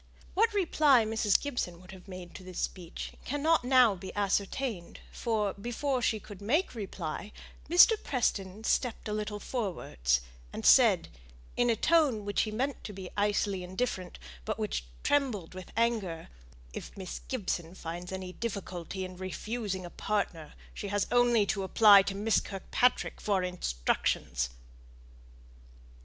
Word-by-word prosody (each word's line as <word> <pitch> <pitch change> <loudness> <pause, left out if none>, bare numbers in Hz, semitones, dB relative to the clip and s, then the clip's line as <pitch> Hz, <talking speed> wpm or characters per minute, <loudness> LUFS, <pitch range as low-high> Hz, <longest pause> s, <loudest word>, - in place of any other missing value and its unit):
What 450 +4 +3
reply 305 - +4
Mrs. 220 -2 +2
Gibson 245 -12 -3
would 185 +2 -13
have 190 0 -13
made 185 -2 -9
to - - -9
this 185 -1 -9
speech 175 -2 -4
cannot 290 +2 +2
now 250 -3 +6
be 190 0 -8
ascertained; 200 0 -1
for, 215 -4 -1
before 245 +5 -2
she 220 -2 +1
could 205 -2 -11
answer, 235 - 0 0.8
Mr. 390 +6 +7
Preston 210 -5 -1
stepped 240 0 0
a 210 - -2
little 210 0 -3
forwards, 165 - -1 0.3
and - - -6
said, - - +6 0.5
in 245 0 +2
a 230 - +3
tone 280 -7 +3
which 205 -1 +1
he 215 - -2
meant 260 +5 -2
to 210 - -6
be 190 -2 -8
icily 205 -2 +1
indifferent, 185 0 -3 0.3
but - - -3
which - - -2 0.2
trembled 250 - 0
with 185 -1 -9
anger, 215 -8 0 0.4
"If - - -8
Miss 190 -2 -6
Gibson 180 -8 -3
finds 175 +1 -6
any 185 -1 -5
difficulty 190 -4 -4
in 185 0 -9
refusing 190 +1 -4
a 175 - -9
partner, 175 -7 -2 0.2
she 205 - -5
has 205 0 0
only 240 -3 +4
to 200 0 -1
apply 200 +1 +7
to 195 0 -3
Miss 210 +2 +2
Kirkpatrick 205 +6 0
for 195 -3 +1
instructions." 60 - -1
205 Hz, 145 wpm, -30 LUFS, 185-240 Hz, 0.8 s, Mr